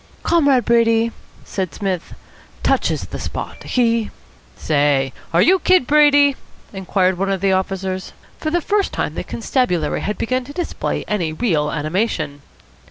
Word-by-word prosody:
"Comrade 280 Hz, -8 st, +3 dB
Brady," 230 Hz, -1 st, +3 dB, 0.3 s
said 185 Hz, -4 st, -3 dB
Psmith, 190 Hz, -4 st, -3 dB, 0.5 s
"touches -, -, +1 dB
the -, -, -7 dB
spot. -, -, -6 dB
He 230 Hz, -3 st, +1 dB, 0.2 s
" -, -, -30 dB
"Say, 145 Hz, -3 st, +1 dB, 0.2 s
are 170 Hz, -, +4 dB
you 375 Hz, +2 st, +4 dB
Kid 365 Hz, -6 st, +3 dB
Brady?" 290 Hz, -1 st, +5 dB, 0.4 s
inquired 190 Hz, -1 st, 0 dB
one 195 Hz, 0 st, 0 dB
of 195 Hz, -1 st, 0 dB
the 195 Hz, +1 st, +2 dB
officers. 190 Hz, 0 st, -2 dB, 0.3 s
For 310 Hz, -, -2 dB
the 345 Hz, +2 st, +1 dB
first 410 Hz, +3 st, 0 dB
time -, -, -2 dB
the -, -, -4 dB
constabulary 180 Hz, -, -1 dB
had 210 Hz, -1 st, -3 dB
begun 255 Hz, +2 st, -1 dB
to 285 Hz, -, -10 dB
display 350 Hz, +1 st, -3 dB
any 175 Hz, -7 st, -1 dB
real 155 Hz, -6 st, 0 dB
animation. 155 Hz, -2 st, -2 dB
205 Hz, 150 wpm, -19 LUFS, 180-260 Hz, 0.5 s, Brady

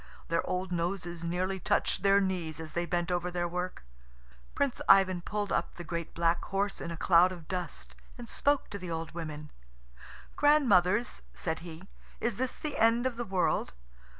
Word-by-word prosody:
Their 165 Hz, 0 st, +1 dB
old 185 Hz, 0 st, -2 dB
noses 175 Hz, 0 st, -2 dB
nearly 185 Hz, +3 st, -1 dB
touched 205 Hz, -, +1 dB
their 200 Hz, 0 st, +5 dB
knees 180 Hz, -5 st, -2 dB
as 160 Hz, -1 st, -7 dB
they 175 Hz, 0 st, -1 dB
bent 175 Hz, 0 st, -1 dB
over 175 Hz, 0 st, 0 dB
their 175 Hz, -1 st, -1 dB
work. 180 Hz, +1 st, -4 dB
Little -, -, -26 dB
Prince 275 Hz, -3 st, 0 dB
Ivan 185 Hz, -2 st, +6 dB
pulled 205 Hz, +2 st, -3 dB
up 170 Hz, -, -1 dB
the 175 Hz, -, -7 dB
great 170 Hz, 0 st, -5 dB
black 170 Hz, 0 st, +2 dB
horse 200 Hz, +1 st, -1 dB
in -, -, -4 dB
a 170 Hz, -, -5 dB
cloud 180 Hz, +1 st, +5 dB
of 170 Hz, -4 st, -9 dB
dust, 180 Hz, -5 st, -5 dB, 0.2 s
and 240 Hz, -1 st, -8 dB
spoke 285 Hz, +4 st, +1 dB
to 200 Hz, -, -5 dB
the 180 Hz, -2 st, -6 dB
old 165 Hz, -1 st, -4 dB
women. 155 Hz, -3 st, -6 dB, 0.8 s
"Grandmothers," 240 Hz, -8 st, +4 dB
said 160 Hz, -2 st, -2 dB
he, 170 Hz, +2 st, -10 dB, 0.3 s
"is 230 Hz, -3 st, -1 dB
this 255 Hz, +1 st, -1 dB
the 305 Hz, -, -4 dB
end 230 Hz, +2 st, +4 dB
of 260 Hz, -2 st, 0 dB
the 240 Hz, -, -3 dB
world? 185 Hz, -, 0 dB
180 Hz, 180 wpm, -30 LUFS, 170-200 Hz, 0.8 s, Ivan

